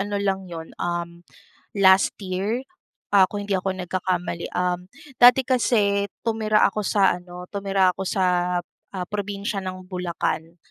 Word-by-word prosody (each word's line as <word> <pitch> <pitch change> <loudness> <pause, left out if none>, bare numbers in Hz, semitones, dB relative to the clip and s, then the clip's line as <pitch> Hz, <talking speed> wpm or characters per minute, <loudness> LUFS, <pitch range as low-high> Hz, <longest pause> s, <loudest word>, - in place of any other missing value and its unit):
ano 205 +1 -2
lang 195 -2 -1
yun, 165 -1 -8
um, 170 0 -3 0.6
last 190 -1 +5
year. 200 +8 -2 0.5
Ah, 195 -2 +7
kung 205 -1 -4
hindi 200 - 0
ako 190 +1 -1
nagkakamali. 180 -1 -2
Um, 180 0 -1 0.3
dati 250 +2 +8
kasi 205 -6 +2 0.2
tumira 215 -1 +2
ako 210 - -3
sa 195 -2 +3
ano, 180 0 -10
tumira 195 -2 +2
ako 195 - -5
sa, 180 -1 +1 0.3
ah, 180 -2 -4
probinsya 205 0 -3
ng 185 0 -6
Bulacan. 175 -2 -3
190 Hz, 140 wpm, -23 LUFS, 180-205 Hz, 0.6 s, dati